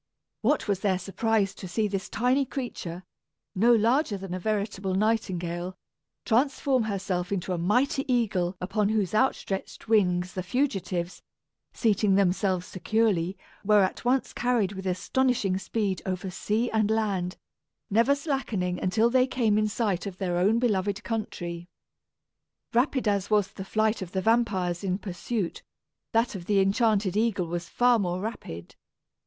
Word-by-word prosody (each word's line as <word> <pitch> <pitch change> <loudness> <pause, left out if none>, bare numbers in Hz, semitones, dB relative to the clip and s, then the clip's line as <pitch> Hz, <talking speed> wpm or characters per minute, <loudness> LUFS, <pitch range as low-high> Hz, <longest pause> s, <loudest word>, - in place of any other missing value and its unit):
What 255 +2 +1
was 200 -2 +1
their 195 -2 +1
surprise 195 +1 0
to 185 - -8
see 210 +4 0
this 195 -1 -4
tiny 250 +5 +2
creature, 220 -10 -5 0.5
no 225 +6 +4
larger 230 +1 +3
than 190 -2 -6
a 185 - -3
veritable 200 -1 -1
nightingale, 185 -4 -1 0.5
transform 260 0 +2
herself 190 -2 -2
into 185 -1 -1
a 175 - -2
mighty 255 - +1
eagle 195 -7 +1
upon 200 +3 0
whose 210 -4 0
outstretched 215 -5 -1
wings 180 -5 +2
the 185 - -3
fugitives, 185 -6 -2 0.5
seating 210 -3 +2
themselves 185 -1 +1
securely, 195 -2 0 0.3
were 210 -1 +5
at 185 - -2
once 255 +2 +1
carried 240 -6 +1
with 190 -1 -6
astonishing 195 +1 +1
speed 195 -1 -2
over 185 0 -3
sea 220 +6 -1
and 215 -2 +2
land, 200 -5 0 0.5
never 235 +7 +4
slackening 240 - -2
until 220 +5 +2
they 255 0 +4
came 230 -5 +1
in 215 0 +2
sight 210 -3 -1
of 190 -2 -7
their 180 -3 -1
own 205 +5 +3
beloved 210 -3 0
country! 175 -6 -4 1.1
Rapid 250 0 +2
as 200 -2 +1
was 210 -2 +3
the 190 - -7
flight 215 +2 0
of 180 -2 -7
the 190 - 0
vampires 205 -6 +1
in 185 -1 0
pursuit, 195 0 -4 0.5
that 230 +1 +2
of 185 -4 -7
the 205 -2 +3
enchanted 200 -1 +2
eagle 210 -4 +1
was 170 +1 -4
far 245 -1 +3
more 180 -2 -1
rapid. 90 - -6
205 Hz, 150 wpm, -27 LUFS, 185-230 Hz, 1.1 s, were